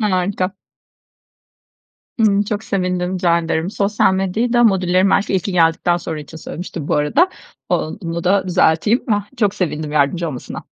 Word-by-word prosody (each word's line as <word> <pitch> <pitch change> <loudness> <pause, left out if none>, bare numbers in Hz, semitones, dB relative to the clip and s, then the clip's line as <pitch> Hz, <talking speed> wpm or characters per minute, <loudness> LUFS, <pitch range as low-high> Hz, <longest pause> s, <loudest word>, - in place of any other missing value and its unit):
Harika. 185 -1 0 1.7
Hı, 205 -2 +4
çok 210 0 -3
sevindim 180 -1 -1
rica 175 -2 +2
ederim. 165 +2 -2
Sosyal 205 -2 +1
medyayı 195 +6 -1
da 240 -1 +4
modüllerin 190 -2 +3
belki 195 0 +1
ilki 190 +1 -1
geldikten 170 0 +2
sonra 160 -3 -5
için 155 +2 -11
söylemiştim 160 -1 -7
bu - - +1
arada. 270 - +3 0.4
O - - +2 0.3
onu 170 0 -4
da 190 +1 +2
düzelteyim. 180 +6 +2
Ah, 205 0 -1
çok 205 -4 +1
sevindim 155 -4 -3
yardımcı 150 +4 +1
olmasına. 130 -5 -7
185 Hz, 150 wpm, -18 LUFS, 165-200 Hz, 1.7 s, Hı